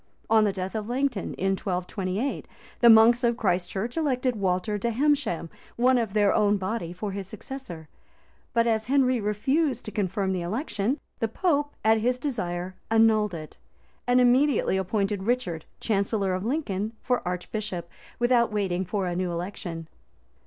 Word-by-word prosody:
On 220 -1 +6
the 205 - +2
death 190 0 -4
of 215 0 -4
Langton, 250 -5 -1
in 195 +1 0
1228, 190 +5 -2 0.3
the 235 - +7
monks 230 +2 +7
of 235 -1 +2
Christ 180 -5 0
church 220 +5 -3
elected 260 -6 0
Walter 195 +1 0
de 235 - 0
Hemesham, 265 - +1 0.3
one 250 +1 +4
of 220 -4 -2
their 205 -1 +4
own 205 0 +3
body, 190 -2 -3
for 195 +3 -5
his 195 -1 -5
successor: 195 - -8 0.6
but 230 0 +2
as 220 -2 +1
Henry 255 -2 +2
refused 255 +6 0
to 215 - -5
confirm 195 -1 -1
the 180 - -2
election, 220 - -2 0.2
the 225 - +1
pope, 290 - 0
at 220 0 +5
his 245 +3 +1
desire, 185 -10 -3 0.2
annulled 220 -3 +3
it;[] 155 -2 -9 0.5
and 245 +1 +4
immediately 250 -2 +3
appointed 195 +1 -1
Richard, 225 -10 -1
chancellor 200 -2 0
of 185 +1 -2
Lincoln, 220 -5 -2
for 250 -1 +1
archbishop, 180 0 -4 0.3
without 240 -1 +3
waiting 190 -3 0
for 190 +1 -2
a 175 -1 -2
new 180 0 -1
election. 170 -2 -5
215 Hz, 160 wpm, -26 LUFS, 185-245 Hz, 0.6 s, the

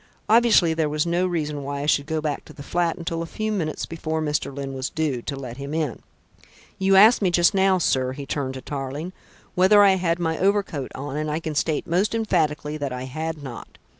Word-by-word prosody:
Obviously 220 -7 +5
there 160 -2 0
was 150 +1 0
no 175 +2 +1
reason 150 -4 -2
why 140 0 -4
I - - -2
should 145 -1 +2
go 160 -1 -1
back 150 -2 -3
to - - -13
the 140 - -10
flat 170 +2 0
until 165 -1 -3
a 165 - -4
few 215 +5 -3
minutes 165 -7 -2
before 160 -1 -3
Mr. 150 -2 -1
Lyne 135 0 -5
was 130 0 -3
due, 150 -6 -2
to 140 - -4
let 125 -3 -7
him 140 +2 -5
in. 150 -8 -2 0.8
You 195 0 +3
asked 215 +5 +7
me 190 - +3
just 175 +2 +4
now, 190 -1 +3
sir," 130 -6 +1
he 140 +1 -7
turned 135 -2 -3
to 130 - -6
Tarling, 145 +6 -5 0.4
"whether 205 +3 +6
I 195 -1 +5
had 170 -2 0
my 160 -2 -1
overcoat 195 -8 0
on, 140 +1 -5
and 155 0 -2
I 150 +1 -1
can 160 -2 -4
state 150 +1 0
most 185 +7 +1
emphatically 155 -8 0
that 140 -3 -3
I 125 0 -4
had 155 +3 -5
not. 125 -4 -9
155 Hz, 225 wpm, -23 LUFS, 140-175 Hz, 0.8 s, asked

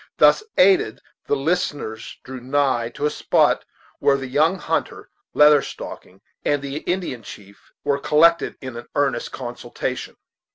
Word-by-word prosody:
Thus - - +6 0.2
aided, 185 - +4 0.3
the - - +2
listeners 140 -7 -2
drew 130 0 -8
nigh 130 -3 +1
to 145 - -2
a 150 - +1
spot - - +2 0.3
where 140 -1 +3
the 135 - -5
young 155 +8 +2
hunter, - - -3 0.2
Leather 150 -1 +7
Stocking, 95 -6 -9 0.2
and 145 - +1
the 140 +1 -4
Indian 175 -7 -3
chief 100 -1 -13
were 140 -1 +1
collected 165 +4 +3
in 130 -3 -7
an 120 - -9
earnest 145 -1 0
consultation. 120 -2 -5
140 Hz, 140 wpm, -22 LUFS, 120-150 Hz, 0.3 s, Leather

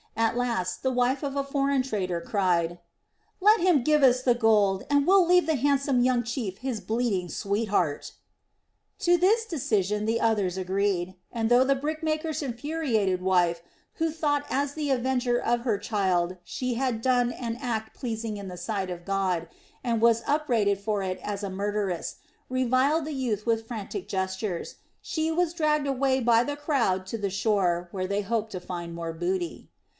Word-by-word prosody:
At 225 0 +2
last 230 -8 -1
the 260 - +2
wife 250 +3 +1
of 280 -1 -3
a 280 - 0
foreign 275 -1 +1
trader 185 -8 -2
cried: 175 -3 0 0.6
"Let 425 +3 +5
him 340 -7 +3
give 300 +2 +3
us 255 -1 +4
the 245 - +4
gold, 210 -5 +3
and 285 -1 +3
we'll 380 +1 +6
leave 360 0 +4
the 320 -1 +1
handsome 275 -1 +2
young 250 -1 +2
chief 225 -5 -4
his 255 -3 -3
bleeding 220 -6 -1
sweetheart." 200 -7 -1 0.9
To 350 0 +4
this 430 +6 +3
decision 215 - 0
the 225 +1 +1
others 205 -6 +1
agreed, 190 -1 -1 0.2
and 225 -1 -1
though 245 +1 +6
the 275 +1 +2
brickmaker's 310 +2 -2
infuriated 240 - -1
wife, 175 -2 +2 0.3
who 325 0 0
thought 290 -2 0
as 280 +1 0
the 300 -2 -3
avenger 250 -1 +1
of 240 0 0
her 230 -4 0
child 185 -4 0
she 250 +6 -3
had 250 -3 -1
done 245 -1 +2
an 235 -1 -4
act 220 -4 -3
pleasing 225 -3 -4
in 200 -1 -7
the 180 -1 -7
sight 190 +1 -3
of 175 -1 -7
God, 190 -4 0 0.4
and 230 -3 0
was 230 0 +4
upbraided 235 -10 +1
for 205 -1 -1
it 185 -1 -3
as 205 -1 -4
a 200 - -2
murderess, 200 -2 -2 0.3
reviled 255 +5 +2
the 310 - -4
youth 235 -6 -2
with 225 -1 0
frantic 235 - -5
gestures, 190 -1 -3 0.3
she 320 -3 -1
was 340 0 +1
dragged 300 -3 +1
away 265 -1 +1
by 235 -1 +4
the 290 +2 -3
crowd 245 - 0
to 230 - -3
the 205 -2 -2
shore 190 -4 +1
where 185 -1 -3
they 200 +1 0
hoped 220 +1 -2
to 185 - -4
find 175 -1 -6
more 165 -1 -4
booty. 175 +1 -3
230 Hz, 175 wpm, -27 LUFS, 195-275 Hz, 0.9 s, we'll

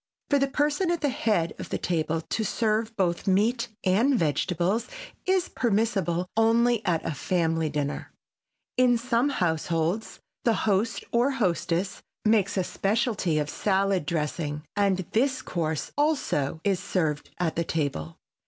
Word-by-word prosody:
For 285 - +5
the 275 - +2
person 295 +5 +1
at 345 -1 0
the 290 - +2
head 220 - 0
of - - -6
the - - -1
table 165 -2 -1
to 220 +7 -2
serve 220 +1 0
both 175 -1 0
meat 230 +6 +2 0.2
and 225 +8 +3
vegetables 175 +6 0 0.4
is 375 -1 +2
permissible 195 -6 0
only 230 +1 +3
at 165 -3 +1
a - - -1
family 165 +1 0
dinner. 145 -1 -3 0.7
In 250 -1 +5
some 240 +3 +1
households 165 - -1 0.2
the 230 -2 +3
host 215 +3 +1
or 240 +3 +3
hostess 185 -6 -1 0.2
makes 205 -2 +3
a 190 - +2
specialty 200 -4 0
of 150 -1 0
salad 195 -1 +1
dressing, 150 -2 -2
and 195 -3 +1
this 260 +3 +1
course, 160 -3 -2
also, 265 - 0
is 195 -3 +1
served 155 -5 -1
at 175 -3 -1
the 170 - +1
table. 140 - -2
195 Hz, 145 wpm, -26 LUFS, 165-235 Hz, 0.7 s, For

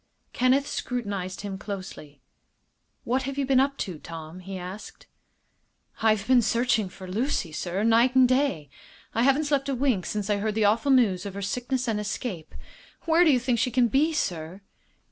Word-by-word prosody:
Kenneth 260 +3 +2
scrutinized 200 -7 -4
him 195 -2 -6
closely. 185 - -8 0.8
"What 255 +3 0
have 275 - -6
you 280 - 0
been 265 -1 +3
up 275 +1 +1
to, 175 -5 -8
Tom?" 165 +2 -9
he 190 +1 -7
asked. 185 +3 -9 1.0
"I've 215 -2 +2
been 255 0 +5
searching 230 -3 +1
for 185 +1 -11
Lucy, 205 - -1
sir, 180 +5 -3
night 230 +3 +4
and 260 -1 +6
day. 250 - 0 0.4
I 230 - +1
haven't 275 +4 +3
slept 285 -2 0
a 275 - 0
wink 245 - 0
since 210 -2 -3
I 205 -1 +1
heard 210 +1 -2
the 220 -1 +2
awful 225 +7 +2
news 205 -8 +3
of 195 - -8
her 200 - -5
sickness 250 +5 -2
and 220 -2 0
escape. 200 -5 -5 0.5
Where 330 +1 +4
do 335 - +4
you 255 - +3
think 245 -1 0
she 230 - +1
can 245 -1 +2
be, 295 +8 +2
sir?" 175 - -3
220 Hz, 185 wpm, -26 LUFS, 190-260 Hz, 1.0 s, and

